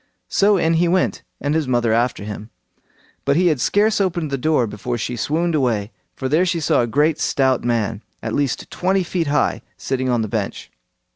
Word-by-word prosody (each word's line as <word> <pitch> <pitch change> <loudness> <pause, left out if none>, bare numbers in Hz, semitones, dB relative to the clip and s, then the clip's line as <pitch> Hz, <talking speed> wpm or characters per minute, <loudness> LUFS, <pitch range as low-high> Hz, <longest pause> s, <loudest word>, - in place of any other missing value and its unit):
So 205 0 +3
in 165 -2 +2
he 175 - +3
went, 185 +2 +1 0.2
and 145 +1 -1
his 160 -3 0
mother 120 -3 +2
after 120 -2 0
him, 105 +1 -7 0.7
but 140 - +2
he 180 +3 +3
had 150 -6 0
scarce 210 +1 +2
opened 170 -5 -1
the - - +1
door 150 -3 +2
before 115 +3 -4
she 120 +2 -3
swooned 165 +8 0
away, 120 -7 0 0.2
for 130 - -3
there 155 +6 +3
she 170 -2 0
saw 150 - +2
a 120 - 0
great 150 +6 +2
stout 130 -2 +1
man, 115 -3 -1 0.2
at 110 - -3
least 140 -3 -1
twenty 190 +1 +1
feet 170 -2 -2
high, 145 - +1 0.2
sitting 130 -1 -2
on 120 -2 +1
the - - -2
bench. - - -4
140 Hz, 200 wpm, -20 LUFS, 120-170 Hz, 0.7 s, So